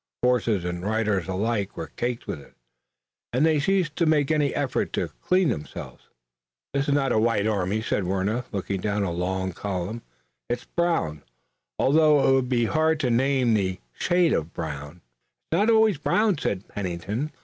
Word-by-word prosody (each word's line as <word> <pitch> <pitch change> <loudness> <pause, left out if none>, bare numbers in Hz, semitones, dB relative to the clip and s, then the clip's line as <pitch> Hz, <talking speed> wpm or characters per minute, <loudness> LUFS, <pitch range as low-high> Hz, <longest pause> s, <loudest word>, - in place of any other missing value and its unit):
Horses 115 -7 +2
and 90 0 -3
riders 105 -3 0
alike 100 +2 -1
were 80 - -6
caked 120 0 -2
with 70 - -5
it, - - -19 0.8
and 130 +6 +2
they 160 -2 +3
ceased 180 -1 +1
to 170 - +2
make 150 -2 +3
any 150 -2 +2
effort 140 -2 -1
to - - -1
clean 185 -3 +3
themselves. 75 - -6 0.6
"This 140 0 0
is 145 - +2
not 135 -3 +1
a 110 - +3
white 110 -2 +2
army," 105 0 0
said 100 - -1
Warner, 100 +6 0
looking 100 -1 -3
down 105 0 0
a 95 - -1
long 95 +2 -2
column, 100 +4 -4 0.5
"it's 120 - -2
brown, 165 - -1 0.6
although 150 0 +4
it - - +5
would 130 -2 +2
be 120 -2 +2
hard 160 +4 +2
to 125 -4 +1
name 130 0 +2
the 95 -3 0
shade 175 -2 +2
of 80 +1 -2
brown." 75 +1 -6 0.5
"It's 165 - +2
not 210 +3 +3
always 220 -7 +4
brown," 210 -2 +2
said 100 -6 -2
Pennington. 100 - -3
115 Hz, 170 wpm, -25 LUFS, 95-145 Hz, 0.8 s, it